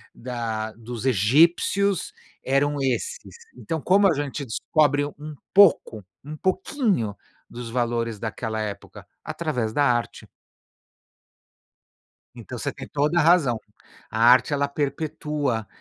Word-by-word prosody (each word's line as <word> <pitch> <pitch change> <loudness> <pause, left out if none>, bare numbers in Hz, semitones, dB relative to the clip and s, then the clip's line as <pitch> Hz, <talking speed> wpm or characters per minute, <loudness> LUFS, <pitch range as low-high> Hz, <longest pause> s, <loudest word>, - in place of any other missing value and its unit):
da 115 -3 -4
dos 115 +1 -8
egípcios 165 - +2 0.3
eram 145 +2 +1
esses". 465 - -1 0.4
Então, 160 -2 -4
como 195 +2 +4
a - - +2
gente 145 -1 -4
descobre 145 +4 +1
um 150 +1 -9 0.2
pouco, 165 - +4 0.2
um 155 +2 -8
pouquinho 190 - 0 0.4
dos 120 -1 -8
valores 115 -2 -1
daquela 110 0 -4
época? 105 -2 -7 0.2
Através 125 -10 -3
da 145 - +2
arte. 120 -3 -1 2.1
Então - - -8
você - - -3
tem - - -10
toda 150 +4 0
a - - +5
razão. 155 -10 +4 0.5
A 110 - -4
arte 125 +4 +5
ela 140 0 +1
perpetua 145 -4 -2
140 Hz, 120 wpm, -24 LUFS, 115-155 Hz, 2.1 s, a